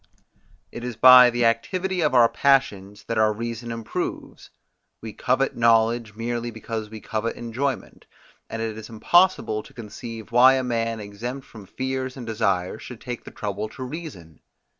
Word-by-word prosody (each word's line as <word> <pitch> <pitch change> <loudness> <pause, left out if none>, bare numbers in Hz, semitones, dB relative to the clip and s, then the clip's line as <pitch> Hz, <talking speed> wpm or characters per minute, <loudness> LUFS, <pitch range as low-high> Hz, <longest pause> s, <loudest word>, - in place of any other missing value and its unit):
It 120 - -8
is 125 -2 -4
by 125 +1 +9
the 120 0 0
activity 180 +11 0
of 150 -4 +1
our 120 -2 +7
passions, 105 -8 +1
that 115 -1 -2
our 110 0 +4
reason 115 +2 -5
improves: 115 -1 -5 0.5
we 110 -1 -8
covet 130 +5 0
knowledge 115 -1 +2
merely 120 +1 -3
because 110 -1 -6
we 110 0 -9
covet 110 +2 -3
enjoyment, 130 +4 -4 0.4
and 115 0 -4
it 110 -1 -4
is 110 - -10
impossible 115 -1 +2
to - - -17
conceive 115 0 -9
why 125 +2 +7
a 130 - 0
man 115 -2 -2
exempt 115 +6 -6
from 105 -4 -13
fears 130 +2 -4
and 125 - -7
desires 100 -3 -1
should 125 -3 -10
take 125 -2 -7
the - - -8
trouble 105 +1 -4
to 130 - -8
reason. 130 - -8
115 Hz, 160 wpm, -24 LUFS, 110-125 Hz, 0.5 s, by